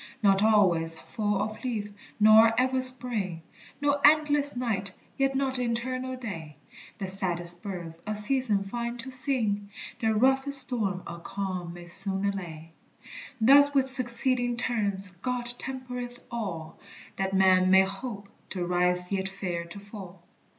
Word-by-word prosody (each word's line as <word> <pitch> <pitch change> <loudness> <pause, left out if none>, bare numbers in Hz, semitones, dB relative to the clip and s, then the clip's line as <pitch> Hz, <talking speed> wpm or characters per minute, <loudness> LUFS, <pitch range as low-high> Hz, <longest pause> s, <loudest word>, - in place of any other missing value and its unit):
Not 195 -1 +4
always 180 -7 +3
fall 205 +2 -2
of 215 +3 -6
leaf 215 -5 -3 0.3
nor 220 +2 +6
ever 260 0 +1
spring, 230 -10 -1 0.4
No 285 0 +1
endless 295 -2 +4
night 215 -6 -1 0.2
yet 270 -1 0
not 265 -1 0
eternal 255 +2 -2
day; 165 -11 -7 0.4
The 195 - -4
saddest 175 -2 -2
birds 170 -4 -7
a 215 - -2
season 210 -1 +1
find 235 +4 -5
to 265 - -9
sing, 230 -6 -1 0.3
The 220 -1 +1
roughest 265 +4 +4
storm 210 -8 -2
a 170 0 -8
calm 185 -2 -5
may 175 0 -10
soon 195 +3 -4
allay; 170 -5 -5 0.7
Thus 285 +5 +6
with 265 -1 +4
succeeding 245 -1 +3
turns 205 -6 -1
God 250 0 -2
tempereth 250 -2 -6
all, 175 -9 -5 0.4
That 195 0 -1
man 185 -1 +4
may 190 0 +6
hope 200 +1 -6 0.2
to 180 -2 -3
rise 180 +1 0
yet 190 -1 -1
fear 180 -3 -4
to 170 +4 -9
fall. 195 -3 -11
210 Hz, 140 wpm, -27 LUFS, 190-250 Hz, 0.7 s, nor